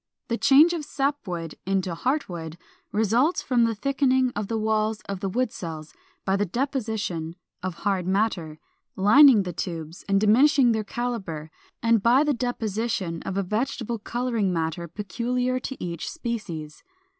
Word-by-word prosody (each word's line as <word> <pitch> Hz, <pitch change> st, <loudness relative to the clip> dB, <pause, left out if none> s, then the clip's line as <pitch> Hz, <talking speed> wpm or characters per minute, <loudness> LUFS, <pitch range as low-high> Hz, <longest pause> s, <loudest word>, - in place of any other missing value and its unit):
The 230 Hz, -, 0 dB
change 305 Hz, +5 st, +6 dB
of 330 Hz, -3 st, -3 dB
sap 285 Hz, -3 st, -2 dB
wood 165 Hz, -3 st, -5 dB
into 190 Hz, -2 st, -1 dB
heart 260 Hz, -, -1 dB
wood 165 Hz, -2 st, -7 dB, 0.3 s
results 230 Hz, -, +2 dB
from 240 Hz, -3 st, +3 dB
the 225 Hz, -1 st, 0 dB
thickening 260 Hz, +1 st, +2 dB
of 205 Hz, -1 st, -2 dB
the 225 Hz, -, -1 dB
walls 215 Hz, 0 st, 0 dB
of 195 Hz, -1 st, -6 dB
the 195 Hz, 0 st, -2 dB
wood 250 Hz, +3 st, 0 dB
cells 160 Hz, -3 st, -7 dB, 0.3 s
by 195 Hz, -, +2 dB
the 200 Hz, -, +1 dB
deposition 215 Hz, -, -2 dB, 0.3 s
of 185 Hz, -1 st, -4 dB
hard 195 Hz, -3 st, 0 dB
matter, 185 Hz, -6 st, 0 dB, 0.4 s
lining 220 Hz, +3 st, +7 dB
the 180 Hz, -1 st, -5 dB
tubes 165 Hz, -2 st, -5 dB
and 195 Hz, 0 st, +4 dB
diminishing 245 Hz, +4 st, +5 dB
their 220 Hz, -1 st, 0 dB
calibre; 195 Hz, -10 st, -4 dB, 0.3 s
and 230 Hz, -2 st, +4 dB
by 245 Hz, +6 st, +5 dB
the 300 Hz, -1 st, +2 dB
deposition 225 Hz, -7 st, -2 dB
of 195 Hz, -, -2 dB
a 195 Hz, -, +1 dB
vegetable 230 Hz, +3 st, -2 dB
coloring 235 Hz, -3 st, -1 dB
matter 165 Hz, 0 st, -2 dB
peculiar 245 Hz, +7 st, -2 dB
to 265 Hz, +1 st, -6 dB
each 170 Hz, -2 st, -4 dB
species. 210 Hz, -, -5 dB
215 Hz, 155 wpm, -25 LUFS, 180-250 Hz, 0.4 s, lining